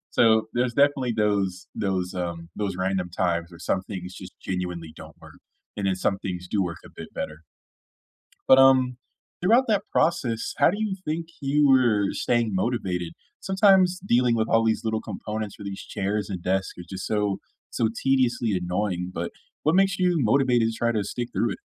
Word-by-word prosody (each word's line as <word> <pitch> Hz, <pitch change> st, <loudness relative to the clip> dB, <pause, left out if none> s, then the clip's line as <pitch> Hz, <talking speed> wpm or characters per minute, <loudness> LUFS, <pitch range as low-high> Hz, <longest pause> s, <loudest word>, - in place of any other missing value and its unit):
So, 110 Hz, -1 st, +5 dB
there's 120 Hz, 0 st, 0 dB
definitely 140 Hz, -3 st, +3 dB
those 100 Hz, -4 st, 0 dB
those, 95 Hz, -3 st, -2 dB
um, 85 Hz, -2 st, -4 dB
those 100 Hz, -3 st, -2 dB
random 95 Hz, -1 st, -1 dB
times 85 Hz, -1 st, -1 dB
where 85 Hz, -, -13 dB
some 90 Hz, +2 st, -1 dB
things 95 Hz, -2 st, -7 dB
just -, -, -10 dB
genuinely 90 Hz, -3 st, -4 dB
don't -, -, -12 dB
work, -, -, -15 dB, 0.4 s
and 100 Hz, -2 st, -1 dB
then 95 Hz, -, +1 dB
some 95 Hz, +1 st, 0 dB
things 90 Hz, -1 st, -5 dB
do 100 Hz, 0 st, 0 dB
work 85 Hz, -2 st, -3 dB
a -, -, -12 dB
bit -, -, -9 dB
better. 75 Hz, -, -4 dB, 1.1 s
But, 130 Hz, -, +8 dB
um, 130 Hz, -2 st, +5 dB, 0.5 s
throughout 235 Hz, +8 st, +5 dB
that 210 Hz, -2 st, +2 dB
process, 120 Hz, -9 st, 0 dB
how 145 Hz, -, +5 dB
do 205 Hz, -, -4 dB
you 205 Hz, -3 st, -1 dB
think 160 Hz, +2 st, -3 dB
you 145 Hz, +1 st, +3 dB
were 115 Hz, -7 st, +4 dB
staying 115 Hz, -4 st, 0 dB
motivated? 95 Hz, -5 st, -1 dB, 0.3 s
Sometimes 190 Hz, -2 st, +4 dB
dealing 120 Hz, -3 st, +3 dB
with 110 Hz, 0 st, 0 dB
all 115 Hz, 0 st, +3 dB
these 110 Hz, -1 st, +1 dB
little 110 Hz, 0 st, 0 dB
components 110 Hz, -1 st, -5 dB
for 100 Hz, -, -10 dB
these 100 Hz, -1 st, -5 dB
chairs 100 Hz, +1 st, -2 dB
and 90 Hz, -3 st, -5 dB
desks 95 Hz, 0 st, -1 dB
are -, -, -6 dB
just 95 Hz, -1 st, -6 dB
so 105 Hz, -2 st, 0 dB, 0.3 s
so 115 Hz, -, +1 dB, 0.2 s
tediously 125 Hz, -4 st, +2 dB
annoying, 90 Hz, 0 st, -2 dB
but, 85 Hz, 0 st, -3 dB, 0.3 s
what 155 Hz, +3 st, +3 dB
makes 195 Hz, -1 st, +3 dB
you 180 Hz, -2 st, +2 dB
motivated 120 Hz, -1 st, +3 dB
to 115 Hz, -, -3 dB
try 120 Hz, 0 st, +1 dB
to 105 Hz, -2 st, 0 dB
stick 120 Hz, +4 st, -4 dB
through 115 Hz, -3 st, +1 dB
it? -, -, -8 dB
110 Hz, 185 wpm, -25 LUFS, 95-130 Hz, 1.1 s, But